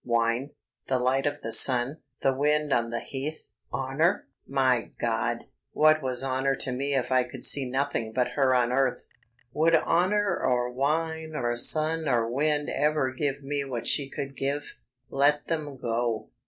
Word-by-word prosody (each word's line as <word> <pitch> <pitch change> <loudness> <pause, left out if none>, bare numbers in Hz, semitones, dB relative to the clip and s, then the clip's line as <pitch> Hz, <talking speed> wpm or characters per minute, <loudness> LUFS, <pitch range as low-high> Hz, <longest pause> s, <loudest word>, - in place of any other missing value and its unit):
Wine? 115 +3 0 0.4
The 130 - +1
light 130 +3 +1
of 145 0 -3
the 115 - -5
sun? 125 +4 +6 0.2
The 135 - +2
wind 150 +2 +1
on 115 0 0
the 115 0 -3
heath? 140 +4 -6 0.2
Honour! 135 +9 0 0.2
My 130 -3 0
God, 115 0 -1 0.3
what 155 0 +4
was 130 -1 -1
honour 135 +1 0
to 130 - +1
me 140 +3 -2
if 125 -1 -1
I 130 0 +4
could 125 -1 -4
see 135 -3 +4
nothing 130 -4 -2
but 125 +1 0
her 130 0 +2
on 125 -1 +2
earth? 130 -1 0 0.5
Would 165 +2 +3
honour 190 +3 +1
or 125 -1 0
wine 160 +4 -2
or 120 -4 -1
sun 155 +5 +2
or 120 -3 +1
wind 145 +4 0
ever 150 -3 0
give 140 +1 -3
me 140 +1 -2
what 130 -4 -5
she 140 -2 +1
could 135 0 -6
give? 140 +2 -3 0.4
Let 145 +2 +2
them 150 -4 -3
go. 115 -2 -2
135 Hz, 165 wpm, -26 LUFS, 125-150 Hz, 0.5 s, sun